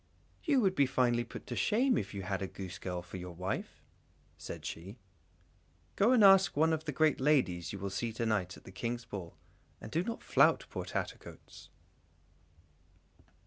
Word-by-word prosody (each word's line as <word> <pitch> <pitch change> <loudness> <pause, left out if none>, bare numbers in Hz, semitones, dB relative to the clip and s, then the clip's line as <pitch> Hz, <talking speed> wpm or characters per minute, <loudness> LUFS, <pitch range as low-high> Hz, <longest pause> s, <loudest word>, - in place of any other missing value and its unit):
"You 285 -6 +3
would 190 -4 +3
be 140 -6 +3
finely 120 -2 +2
put 120 - -10
to 120 - -5
shame 245 - +2
if 100 - -2
you 100 -2 -5
had 95 0 -2
a 95 - -2
goosegirl 90 -1 -6
for 90 +1 -8
your 90 -1 -8
wife!" 90 +3 -4 0.5
said - - -8
she; 95 +8 -7 1.0
"go 215 +5 +4
and 245 -4 +5
ask 195 -4 +6
one 160 +2 +4
of 160 0 -2
the 150 - -2
great 155 0 +2
ladies 130 - +2
you 100 - -5
will 100 0 -4
see 115 +5 -2
to 115 +1 -2
night 100 -5 -1
at - - -16
the - - -11
King's 120 +4 -4
ball, 95 -7 -7 0.4
and 110 - -9
do 165 - +1
not 230 +3 -5
flout - - +4
poor - - -4
Tattercoats." - - -7
120 Hz, 180 wpm, -32 LUFS, 95-160 Hz, 1.0 s, ask